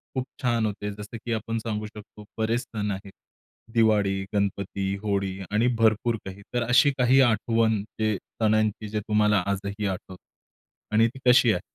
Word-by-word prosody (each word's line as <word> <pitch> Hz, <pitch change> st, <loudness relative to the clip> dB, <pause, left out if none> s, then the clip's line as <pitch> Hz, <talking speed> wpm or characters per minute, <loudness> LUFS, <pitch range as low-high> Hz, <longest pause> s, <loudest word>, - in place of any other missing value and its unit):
खूप 130 Hz, -, 0 dB, 0.2 s
छान 120 Hz, -4 st, +1 dB
होते. 105 Hz, 0 st, -3 dB
जसं 105 Hz, +2 st, -8 dB
की 120 Hz, -, -1 dB
आपण 115 Hz, +1 st, -2 dB
सांगू 110 Hz, -1 st, -3 dB
शकतो 105 Hz, 0 st, -12 dB
बरेच 115 Hz, +2 st, 0 dB
सण 105 Hz, -4 st, -4 dB
आहेत. 100 Hz, 0 st, -6 dB, 0.6 s
दिवाळी, 105 Hz, -4 st, +3 dB
गणपती, 100 Hz, -1 st, -1 dB
होळी 100 Hz, -2 st, -1 dB
आणि 110 Hz, +3 st, +2 dB
भरपूर 115 Hz, +1 st, +3 dB
काही. 95 Hz, +1 st, -8 dB
तर 120 Hz, -1 st, +1 dB
अशी 125 Hz, +5 st, +5 dB
काही 130 Hz, +1 st, +5 dB
आठवण 115 Hz, -2 st, +2 dB, 0.2 s
जे 110 Hz, -1 st, +1 dB, 0.3 s
सणांची 110 Hz, -1 st, +1 dB
जे 105 Hz, +1 st, -1 dB
तुम्हाला 105 Hz, -1 st, +2 dB
आजही 100 Hz, +1 st, -2 dB
आठवतं 95 Hz, 0 st, -5 dB, 0.8 s
आणि 110 Hz, +2 st, +5 dB
ती 125 Hz, +3 st, -9 dB
कशी 125 Hz, -2 st, +6 dB
आहे? 90 Hz, -, -1 dB
110 Hz, 160 wpm, -26 LUFS, 100-115 Hz, 0.8 s, कशी